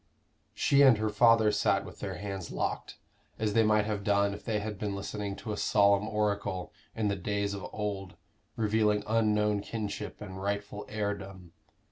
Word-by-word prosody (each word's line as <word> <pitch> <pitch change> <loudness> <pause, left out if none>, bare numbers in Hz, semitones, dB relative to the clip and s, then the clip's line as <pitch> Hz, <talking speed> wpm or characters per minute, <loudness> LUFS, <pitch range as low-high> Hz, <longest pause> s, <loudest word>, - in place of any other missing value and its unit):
She 140 0 +4
and 130 -5 +7
her 110 0 0
father 110 0 +5
sat - - +1
with - - -11
their - - -4
hands 95 -3 -5
locked, - - -3 0.4
as 110 -2 -1
they 115 - +5
might 105 -1 +3
have 105 -2 -2
done 100 0 +2
if 105 - -9
they 110 -3 -1
had 105 -1 -5
been 100 -2 -2
listening 100 0 -4
to 110 - -6
a 105 - -3
solemn 100 -1 +3
oracle 105 -4 -1 0.2
in 110 -2 0
the 100 - +1
days 100 +1 -2
of 100 -2 -5
old 100 -3 -4 0.4
revealing 105 -1 +2
unknown 105 -2 +2
kinship 105 -1 -5
and 95 -2 -8
rightful 100 +1 -3
heirdom. 100 -4 -4
105 Hz, 170 wpm, -30 LUFS, 100-105 Hz, 0.4 s, and